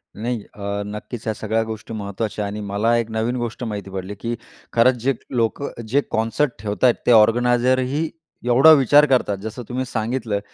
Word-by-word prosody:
नाही. 120 +1 -3
अ, 100 0 -4
नक्कीच, 105 +3 -7
ह्या 110 - 0
सगळ्या 110 +2 -1
गोष्टी 110 0 -7
महत्त्वाच्या 105 +1 -3
आणि 100 +1 -5
मला 110 +4 +2
एक 115 -1 -1
नवीन 110 +3 -1
गोष्ट 120 0 -4
माहिती 105 -4 -5
पडली, 95 +1 -5
की 115 +4 -4 0.4
खरंच 120 +2 +5
जे 135 +2 +2 0.2
लोकं 120 +4 0 0.2
जे 135 +6 +2
कॉन्सर्ट 115 +3 -1 0.4
ते - - +4
ऑर्गनायझर 120 +3 +4
ही 145 +5 -1 0.4
एवढा 130 +6 +7
विचार 145 0 +6
करतात, 125 -7 +1
जसं 110 +5 -7
तुम्ही 130 +1 -2
सांगितलं, 110 -2 -2
115 Hz, 165 wpm, -21 LUFS, 105-125 Hz, 0.4 s, एवढा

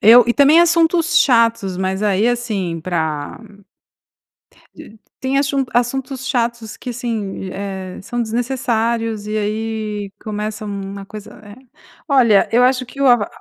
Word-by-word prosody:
Eu 230 +3 +8
e 240 - +3
também 290 +5 +6
assuntos 335 0 +3
chatos, 230 -8 +2
mas 190 +1 -2
aí, 210 +2 +2
assim, 210 -9 -2
pra 160 -4 -3 1.3
de 220 - -13 0.2
tem 265 +1 0
assun 275 -1 +1
assuntos 260 +2 -1
chatos 235 -4 -2
que 250 - -6
assim, 230 -5 -4
di 190 - -6
eh, 190 -2 -6
são 240 +4 -4
desnecessários 230 -2 -1
e 215 +1 -3
aí 215 -1 -3
começa 215 0 -4
uma 200 -1 -6
coisa, 210 0 -11
eh. 205 0 -12 0.5
Olha, 240 -8 +4
eu 245 +2 +4
acho 255 0 +2
que 275 - -11
o 275 - +3
arró 240 -5 +5
225 Hz, 145 wpm, -18 LUFS, 205-250 Hz, 1.3 s, Eu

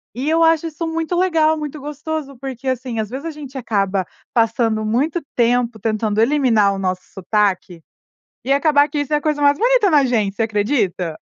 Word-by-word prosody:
E 265 +5 -2
eu 325 +1 +3
acho 325 0 +3
isso 325 +1 -5
muito 325 +1 -2
legal, 325 -4 +2
muito 300 0 -6
gostoso, 295 0 -5
porque 265 -1 -7
assim, 255 -2 -2
às 215 -2 -2
vezes 265 +6 -6
a 330 - -3
gente 280 -3 -9
acaba 200 -6 -1 0.3
passando 225 -1 +1
muito 275 +10 0
tempo 240 -1 +1
tentando 215 0 -1
eliminar 230 -5 +3
o 195 - -5
nosso 185 -1 -2
sotaque 190 -3 -1 0.6
e 270 - +1
acabar 285 0 +3
que 295 - -4
isso 290 +1 -4
é - - +4
a - - -1
coisa 300 -1 -1
mais 285 0 +4
bonita 480 -2 +3
na 295 -3 +4
gente, 215 -6 0
você 225 - 0
acredita? 205 - -1
260 Hz, 190 wpm, -19 LUFS, 215-300 Hz, 0.6 s, é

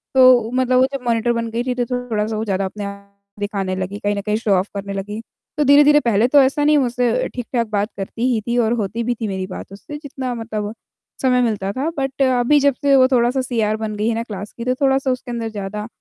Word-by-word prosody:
तो 255 -3 +6
मतलब 255 0 +2
वो 260 - +5
जब 275 - -3
मॉनिटर 230 0 +2
बन 230 -1 -2
गई 235 +2 -1
थी 250 0 -1
तो 245 -1 0 0.2
थोड़ा-सा 215 0 -1
वो 220 - -2
ज़्यादा 195 -2 -1
अपने 205 +2 -6
आप 200 0 -9 0.3
दिखाने 200 -2 -2
लगी, 190 +2 -4
कहीं 205 0 -1
न 200 - -2
कहीं 210 +1 -1
शो 220 -2 -1
ऑफ 185 +2 0
करने 200 0 -4
लगी। 205 +3 -5 0.4
तो 300 - +3
धीरे-धीरे 290 +1 +6
पहले 230 -4 +2
तो 285 +2 +6
ऐसा 275 +3 +2
नहीं, 300 0 +4
मुझसे 245 -3 +1
ठीक-ठाक 240 -1 -2
बात 210 0 -1
करती 205 +4 -3
ही 220 - 0
थी 240 +1 0
और 230 -1 +2
होती 225 0 -2
भी 240 +1 -1
थी 220 -1 -4
मेरी 190 -2 -3
बात 185 - -8
उससे, 295 +9 -8
जितना 270 -3 -5
मतलब 215 -2 -4 0.5
समय 250 -1 +3
मिलता 210 -5 -1
था 275 +7 -1
बट 270 0 -2
अभी 260 +2 +4
जब 280 0 +3
से 280 -1 +4
वो 260 -1 +6
थोड़ा-सा 250 0 +2
सीआर 225 -4 0
बन 215 -1 -4
गई 210 +1 -1
है 230 - 0
ना 230 - -2
क्लास 205 -3 -7
की, 235 - -7
तो 255 0 +1
थोड़ा-सा 270 -1 +2
उसके 255 0 -4
अंदर 230 -1 -3
ज़्यादा 210 0 -5
230 Hz, 245 wpm, -20 LUFS, 210-255 Hz, 0.5 s, तो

